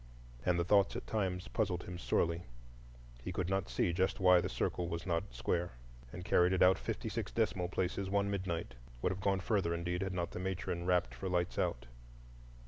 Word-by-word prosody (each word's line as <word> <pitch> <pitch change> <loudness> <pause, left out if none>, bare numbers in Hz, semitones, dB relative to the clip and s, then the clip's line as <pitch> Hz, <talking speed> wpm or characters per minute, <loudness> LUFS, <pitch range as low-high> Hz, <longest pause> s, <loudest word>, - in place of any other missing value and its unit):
And 90 +2 +2
the 85 - +2
thoughts 100 +2 +4
at - - -4
times 95 -4 -1
puzzled 95 -6 -1
him 90 0 -7
sorely; 85 0 +1 0.8
he 75 - -4
could 90 0 -2
not 95 0 0
see 85 - +1
just 95 +2 +1
why 90 -1 +6
the - - -2
circle 90 - -1
was 85 0 -4
not 85 -5 -2
square, 85 +8 -1 0.4
and 90 - -7
carried 90 +1 +4
it 95 - +4
out 95 +1 +6
fifty - - -3
six - - -3
decimal 90 -1 0
places 95 +1 -1
one 100 0 +2
midnight,—would 80 -9 -3
have 95 +1 -4
gone 95 -1 +1
further, 90 -4 +1
indeed, 85 +1 -2
had 95 -1 -2
not 85 -2 -2
the - - -5
matron 90 -2 -3
rapped 90 -9 +2
for 65 +10 -4
lights 90 -1 0
out. - - 0
90 Hz, 195 wpm, -34 LUFS, 85-95 Hz, 0.8 s, why